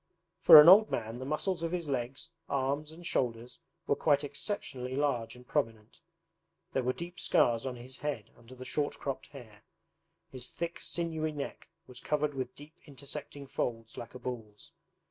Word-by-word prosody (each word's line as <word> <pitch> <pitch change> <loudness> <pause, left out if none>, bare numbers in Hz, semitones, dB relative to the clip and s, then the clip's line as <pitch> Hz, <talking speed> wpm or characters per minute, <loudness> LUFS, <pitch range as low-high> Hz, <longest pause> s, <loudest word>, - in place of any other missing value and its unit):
For - - +11
an 150 - +9
old 205 +5 +9
man, 115 +1 -3
the 130 - -5
muscles 170 +4 -1
of 165 0 -2
his 175 -3 -2
legs, 135 +3 -3 0.2
arms, 140 +3 -1
and 170 +2 -12
shoulders 120 -6 -1 0.3
were - - +2
quite 145 -1 +3
exceptionally 140 - -3
large 135 -6 0
and 125 0 -15
prominent. 115 -7 -2 0.7
There 135 - +2
were 125 0 +1
deep 175 +6 -7
scars 125 -8 +3
on 125 - -4
his 125 +2 -8
head 140 -7 -4
under 120 +2 -14
the 130 0 -9
short 145 +2 -1
cropped 135 -2 -4
hair. 110 -7 -13 0.7
His 125 -1 -5
thick 170 0 -5
sinewy 160 -2 -2
neck 145 -2 -6 0.2
was 125 -4 -10
covered 150 +1 0
with 130 -2 -4
deep 150 +2 -14
intersecting 140 0 -7
folds 115 -4 -3
like 120 - -8
a - - -7
bull's. 120 +2 -7
135 Hz, 170 wpm, -31 LUFS, 125-150 Hz, 0.7 s, For